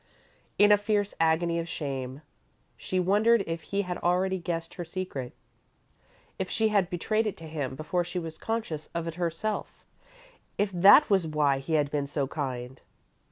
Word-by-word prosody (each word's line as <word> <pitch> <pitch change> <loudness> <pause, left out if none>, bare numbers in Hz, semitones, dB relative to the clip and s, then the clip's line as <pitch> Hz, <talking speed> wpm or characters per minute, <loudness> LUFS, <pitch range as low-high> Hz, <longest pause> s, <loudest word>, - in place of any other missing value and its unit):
In 205 0 +6
a 205 - +6
fierce 205 -1 0
agony 165 +1 +2
of 165 0 -4
shame, 135 -2 -5 0.5
she 185 - -2
wondered 210 +4 +4
if 165 0 -4
he 200 0 -2
had 180 -1 -4
already 185 +2 +1
guessed 165 -1 -4
her 175 - -5
secret 165 -8 -5 1.1
if 190 - -2
she 220 -1 +1
had 200 -4 +2
betrayed 215 +5 0
it 210 - -4
to 165 - -9
him 145 -4 -4
before 165 +5 -1
she 175 +1 -6
was 165 -2 -5
conscious 215 -9 -3
of 170 -1 -2
it 165 - -4
herself; 175 +5 -3 0.7
if 205 0 +1
that 195 - +7
was 190 -4 +3
why 145 -3 +2
he 135 +4 -4
had 145 -2 +2
been 145 -2 -1
so 145 -1 -1
kind. 130 -3 -5
170 Hz, 170 wpm, -28 LUFS, 150-195 Hz, 1.1 s, that